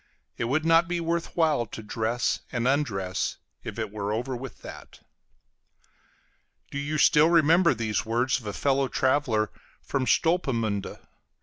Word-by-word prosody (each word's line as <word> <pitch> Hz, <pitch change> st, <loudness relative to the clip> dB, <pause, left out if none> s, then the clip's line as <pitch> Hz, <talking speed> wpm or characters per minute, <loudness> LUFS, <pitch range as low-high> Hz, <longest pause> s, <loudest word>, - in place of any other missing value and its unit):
It 120 Hz, -, -2 dB
would 150 Hz, +6 st, 0 dB
not 165 Hz, +1 st, +5 dB
be 175 Hz, 0 st, -1 dB
worth 170 Hz, 0 st, -2 dB
while 155 Hz, -8 st, +2 dB
to 110 Hz, -, -8 dB
dress 115 Hz, +3 st, -1 dB
and 120 Hz, 0 st, -1 dB
undress 110 Hz, -10 st, -1 dB, 0.3 s
if -, -, -7 dB
it 110 Hz, -3 st, -3 dB
were 105 Hz, -1 st, -3 dB
over 125 Hz, +4 st, -2 dB
with 130 Hz, 0 st, -9 dB
that. -, -, -11 dB, 1.7 s
Do 140 Hz, -, -3 dB
you 150 Hz, +2 st, -2 dB
still 150 Hz, +2 st, +5 dB
remember 170 Hz, -1 st, +4 dB
these 110 Hz, -3 st, -1 dB
words 120 Hz, +4 st, 0 dB
of 110 Hz, -, -11 dB
a 105 Hz, -, -3 dB
fellow 135 Hz, +2 st, +1 dB
traveler 130 Hz, -6 st, +1 dB, 0.3 s
from 135 Hz, -2 st, -2 dB
Stolpemünde? 115 Hz, -, 0 dB
130 Hz, 145 wpm, -26 LUFS, 110-155 Hz, 1.7 s, not